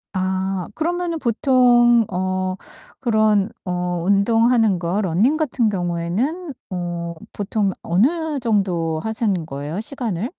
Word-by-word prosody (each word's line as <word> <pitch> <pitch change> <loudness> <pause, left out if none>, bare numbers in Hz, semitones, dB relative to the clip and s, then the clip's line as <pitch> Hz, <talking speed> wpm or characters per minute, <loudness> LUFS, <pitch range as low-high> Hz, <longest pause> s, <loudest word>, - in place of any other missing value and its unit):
아 190 0 -1
그러면은 345 +1 -1
보통 240 -2 +4
어 185 0 -1 0.4
그런 215 -4 +2 0.2
어 180 -1 -2
운동하는 225 +1 +3
거 175 +4 -1
러닝 210 - +2
같은 255 -7 +1
경우에는 195 - -2 0.2
어 175 -2 -4 0.2
보통 205 0 -1
어느 295 - +1
정도 185 -9 0
하시는 215 -6 -1
거예요, 145 +5 -5
시간을? 225 -5 -1
205 Hz, 230 characters per minute, -21 LUFS, 180-240 Hz, 0.4 s, 보통